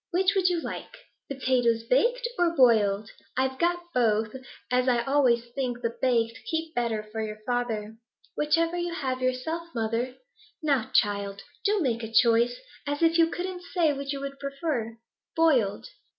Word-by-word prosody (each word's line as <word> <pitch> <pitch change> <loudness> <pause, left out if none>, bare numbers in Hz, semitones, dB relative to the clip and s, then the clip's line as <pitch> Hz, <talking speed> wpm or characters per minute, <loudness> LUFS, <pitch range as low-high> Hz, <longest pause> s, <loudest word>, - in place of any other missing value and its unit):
Which 375 +2 +2
would 370 -2 +3
you 350 -2 0
like, - - -7 0.3
potatoes 245 -4 +1
baked 475 - +2
or 340 -1 +2
boiled? 215 -6 +4 0.3
I've 260 0 0
got 350 +1 +1
both, 220 -2 +1 0.4
as 250 +1 +2
I 240 -2 +3
always 240 -3 +2
think 245 -2 -3
the 230 0 -1
baked 230 -3 +1
keep 320 0 -2
better 230 -4 -1
for 220 0 -3
your 215 -1 -4
father.' 225 -3 -2 0.4
'Whichever 330 +3 +1
you 345 -1 -2
have 260 -6 -2
yourself, 255 +7 -2
mother.' 230 +3 -1 0.5
'Now, 280 -7 +1
child, 200 -1 +1 0.2
do 415 -1 +2
make 235 -6 0
a 225 -1 -6
choice! 235 +1 +4 0.3
As 290 +3 -1
if 330 +1 +4
you 330 0 +5
couldn't 360 +1 -4
say 340 -4 +1
which 275 0 -4
you 280 - -3
would 275 0 -6
prefer.' 275 -5 -3 0.4
'Boiled.' 260 - +2
255 Hz, 160 wpm, -27 LUFS, 230-325 Hz, 0.5 s, you